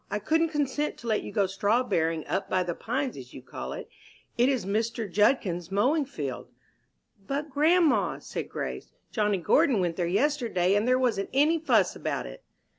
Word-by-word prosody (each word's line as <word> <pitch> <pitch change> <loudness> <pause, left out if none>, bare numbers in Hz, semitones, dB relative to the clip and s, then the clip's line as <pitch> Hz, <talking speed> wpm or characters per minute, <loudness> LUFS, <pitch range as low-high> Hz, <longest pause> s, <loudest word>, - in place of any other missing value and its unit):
"I 210 - -1
couldn't 320 +10 +1
consent 295 -1 -1
to 235 - -10
let 215 -2 +1
you - - -7
go 205 -3 +2
strawberrying 195 -5 0
'up 195 - -2
by 185 0 +1
the 175 -1 -3
Pines' 250 - -3
as 125 -2 -11
you 130 - -10
call - - -7
it. - - -7 0.5
It 245 +2 +3
is 260 -8 0
Mr. 220 +2 -1
Judkins's 195 -4 +1
mowing 270 +10 +2
field." 280 - -5 0.8
"But, 290 +2 -3
grandma," 315 +4 +3
said - - -6
Grace, - - -5 0.2
"Johnny 210 -3 +1
Gordon 255 - +3
went 175 -2 -1
there 175 -2 0
yesterday, 225 - +1
and 205 +3 +2
there 255 0 +4
wasn't 235 -6 0
any 300 +5 +3
fuss 245 - +2
about - - -3
it." - - -10
225 Hz, 180 wpm, -27 LUFS, 190-280 Hz, 0.8 s, there